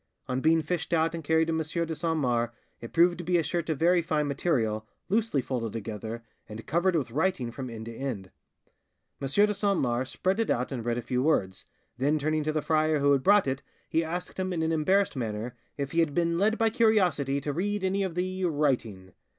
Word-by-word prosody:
On 130 0 -1
being 160 +1 +3
fished 170 +1 -2
out 165 0 +2
and 165 -1 -5
carried 160 +2 +3
to - - +1
M. 160 - 0 0.3
de 165 - -4
Saint 160 +1 -1
Mars, 120 -5 +1 0.3
it 115 - -9
proved 175 +1 +4
to - - -4
be 175 +1 +2
a 165 - +2
shirt 170 +2 -2
of 155 - 0
very 175 +3 +4
fine 155 -2 0
material, 115 -8 0 0.2
loosely 210 - +1
folded 115 -5 -3
together, 115 +1 -5 0.3
and 110 +1 -8
covered 175 +2 +1
with 135 -7 -1
writing 145 -4 0
from 130 +1 -6
end 110 -1 -7
to 115 - -7
end. 115 -9 -5 0.9
M. 135 - -1
de 205 +9 +3
Saint 200 -2 +1
Mars 125 +1 0
spread 190 +8 -1
it 225 - 0
out 125 +3 0
and 125 -4 -4
read 120 0 -1
a 120 - -3
few 125 0 -1
words, 95 -11 0 0.3
then 145 +4 +2
turning 155 +1 0
to 155 - 0
the 155 -1 -1
friar 155 -1 +2
who 140 0 +3
had 140 -2 +3
brought 205 +5 +5
it 135 0 -2 0.3
he 165 - +1
asked 175 +3 -5
him 185 0 -1
in 165 -2 -1
an 160 - +1
embarrassed 185 +5 +2
manner 115 0 -4 0.2
if 140 -1 -3
he 165 - +1
had 160 -4 +1
been 170 0 +1
led 215 +3 +2
by 225 -1 +2
curiosity 190 - +2
to 145 +1 -3
read 205 +5 -1
any 190 +1 +1
of 190 -4 -2
the, 185 +1 -2
writing. 125 - -1
155 Hz, 225 wpm, -28 LUFS, 125-175 Hz, 0.9 s, brought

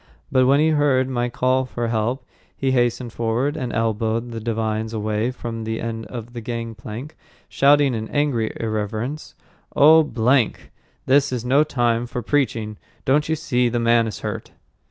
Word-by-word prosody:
But 130 -1 +4
when 140 +2 +5
he 155 +1 +4
heard 145 -4 +2
my 120 -2 -1
call 130 +2 +1
for 120 -2 -3
help, 115 +4 -1 0.3
he 135 -1 0
hastened 120 -1 0
forward, 120 +6 -1
and 130 -6 -3
elbowed 115 +1 -1
the 115 - -5
divines 110 0 -2
away 110 +1 -1
from 115 -3 -6
the 110 0 -3
end 115 0 -4
of 120 -1 -8
the 120 - -6
gangplank, 115 +3 -6 0.3
shouting 140 -1 +4
in 110 -1 -3
angry 140 -7 0
irreverence, 110 +6 -3 0.4
"Oh, 160 +3 +7
blank! 125 -4 +1 0.3
This 140 +1 +3
is 125 -2 -3
no 135 +4 +4
time 120 -5 0
for 120 0 -5
preaching! 115 -6 -1 0.3
Don't 150 +4 +2
you 160 - +2
see 125 -6 0
the 120 0 -1
man 115 0 +3
is 105 - -6
hurt?" - - -5
120 Hz, 165 wpm, -22 LUFS, 115-135 Hz, 0.4 s, Oh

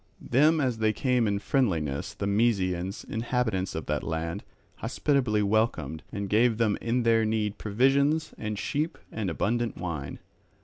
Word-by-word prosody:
Them 150 +6 +5
as 125 -5 0
they 110 -1 +2
came 125 0 +1
in 100 -1 +1
friendliness, 85 - 0
the - - -3
Mysians, 100 -3 0
inhabitants 110 -5 -1
of - - -4
that - - -1
land, 80 +1 -3 0.3
hospitably 125 -3 +1
welcomed, 100 - 0
and 100 -1 -3
gave 110 +3 +3
them 110 -3 +2
in 120 +1 0
their 115 -1 +4
need 110 -1 -1
provisions 140 +8 +2
and 105 -1 -4
sheep 150 - -2
and 105 -4 -2
abundant 115 +7 -1
wine. 80 -6 -4
110 Hz, 145 wpm, -27 LUFS, 100-125 Hz, 0.3 s, Them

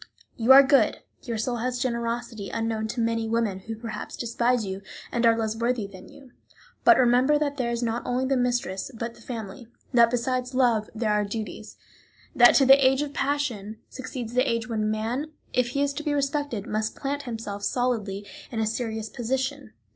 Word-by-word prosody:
You 235 +2 +3
are 275 +1 +10
good, 275 0 +4 0.2
your 235 -3 -4
soul 240 +2 -1
has 250 +2 -2
generosity 235 -3 -3
unknown 225 -1 -2
to 235 - -4
many 230 -1 0
women 225 -4 0
who 225 +4 -6
perhaps 220 -1 -7
despise 235 0 0
you, 190 0 -5 0.3
and 235 0 +2
are 225 0 +4
less 220 -1 -1
worthy 235 -1 0
than 190 -2 -12
you. 275 -3 -16 0.5
But - - +7
remember 255 +4 +4
that 290 -1 -1
there 245 -3 -1
is 235 0 -2
not 230 +1 -1
only 250 +1 -1
the 270 +1 +1
mistress, 245 -6 -1
but 230 +1 -4
the - - -18
family; 225 -1 -7 0.3
that 235 -1 +6
besides 250 +1 -1
love 235 -5 +2
there 220 -1 0
are 210 0 +2
duties; 215 +1 -6 0.6
that 240 0 +7
to 275 - +6
the 270 +1 +7
age 265 +2 +4
of 290 -1 -6
passion 265 -8 -2
succeeds 255 -3 -6
the 250 - +3
age 230 +1 -1
when 215 -2 -1
man, 240 +8 -2 0.2
if 250 -1 +2
he 280 +3 0
is 285 0 0
to 305 - -5
be 300 -2 0
respected, 280 -6 -1
must 215 +1 -2
plant 285 +1 -3
himself 220 -3 -5
solidly 210 -5 -1 0.2
in 230 - -4
a 220 - +1
serious 220 -1 -3
position. 255 - -3
235 Hz, 190 wpm, -26 LUFS, 220-260 Hz, 0.6 s, are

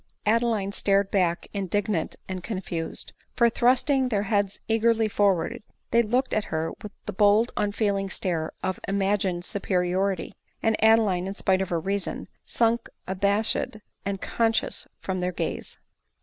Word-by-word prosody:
Adeline 220 -2 +2
started 200 0 +2
back 175 -3 +1
indignant 200 -2 -1
and 185 -1 -4
confused; 180 -5 -4 0.2
for, 235 -1 +4
thrusting 255 +2 +3
their 205 -4 +1
heads 200 -2 0
eagerly 225 0 +3
forward, 200 -5 +1 0.3
they 235 - +5
looked 245 +4 0
at 215 - +1
her 160 0 -2
with 210 - -7
the - - -4
bold 210 +4 +4
unfeeling 200 -1 0
stare 170 -4 -2
of 185 -1 -1
imagined 195 -2 0
superiority; 185 -1 0 0.3
and 225 -1 +3
Adeline, 205 -5 +4
spite 190 -1 +2
of 190 - -2
her 170 - 0
reason, 195 +3 -2 0.2
sunk 230 0 +1 0.2
abashed 200 +3 +1 0.3
and 195 -1 -2
con 225 +2 +1
scious - - -1
from 185 -1 -3
their 180 0 0
gaze. - - -4
200 Hz, 140 wpm, -26 LUFS, 185-220 Hz, 0.3 s, they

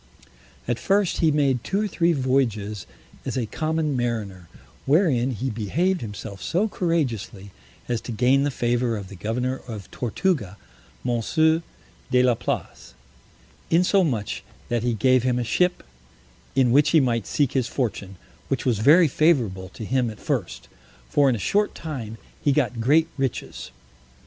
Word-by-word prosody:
At 120 0 -1
first 200 -2 +1
he 165 - +4
made 140 -5 +1
two 200 +2 -1
or - - 0
three 170 -3 +1
voyages 120 - 0 0.4
as - - -3
a 125 - 0
common 155 +3 -1
mariner, 110 -7 -3 0.4
wherein 140 -5 +3
he 130 +1 -3
behaved 160 - 0
himself 105 -2 -7
so 190 - 0
courageously 125 - -2 0.4
as 120 -2 -1
to - - -7
gain 125 +4 +3
the 145 - +1
favor 120 -2 0
of 100 -2 -8
the 100 - -10
governor 125 +7 -2
of 105 -5 -8
Tortuga, 120 - -1 0.5
Monsieur 155 +7 +2 0.5
de 125 -1 +4
la 125 -1 +4
Place; 115 - -5 0.7
insomuch 165 - +1 0.3
that 120 -1 0
he 120 0 0
gave 130 +3 +3
him 125 0 +1
a 125 - 0
ship, 180 +10 +1 0.7
in 130 -3 +4
which 145 +4 +5
he 160 - +5
might 115 -6 0
seek 140 -3 +1
his 130 -4 0
fortune, 105 -8 -3 0.3
which - - -2
was 120 -5 +1
very 155 +9 +6
favorable 120 - +1
to 110 - -8
him 130 0 +1
at 110 - -9
first; - - -3 0.4
for 145 -2 +4
in 125 - +2
a 105 - -4
short 205 +1 +1
time 125 -9 -6 0.3
he 145 - +3
got 125 -3 0
great 155 +7 +4
riches. 135 - -3
125 Hz, 155 wpm, -24 LUFS, 115-155 Hz, 0.7 s, very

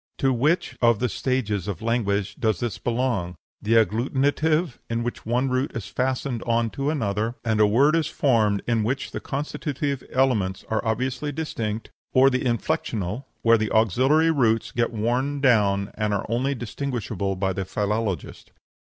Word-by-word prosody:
To 135 -1 +2
which 130 0 0
of 115 -2 +5
the 125 - 0
stages 110 -7 -1
of 100 +2 -4
language 105 -4 0
does 110 -6 +1
this 120 -5 -3
belong 115 -8 -1 0.3
the 110 - 0
agglutinative, 140 - +1
in 115 0 -1
which 120 -2 -5
one 125 +3 +1
root 130 +2 0
is 115 -5 -4
fastened 130 +2 -2
on 115 -1 0
to 140 +1 -2
another, 110 -5 -1
and 110 -2 +1
a 105 - +6
word 140 +9 +4
is 160 -3 +1
formed 110 -9 +2
in 115 -2 +1
which 130 +5 -2
the - - -4
constitutive 140 -1 -3
elements 110 -8 +1
are 110 - 0
obviously 125 +5 -1
distinct, 115 -8 -4 0.2
or 135 +1 +6
the 130 - 0
inflexional, 115 -2 -1 0.2
where 115 0 +5
the 110 -1 -1
auxiliary 130 - +3
roots 115 -7 +1
get 120 0 0
worn 125 +6 -1
down 100 -7 +3
and 105 -1 -1
are 100 - -2
only 130 +5 0
distinguishable 115 -6 -3
by 95 0 -1
the 95 - -2
philologist? 100 -1 -3
120 Hz, 165 wpm, -24 LUFS, 105-135 Hz, 0.3 s, a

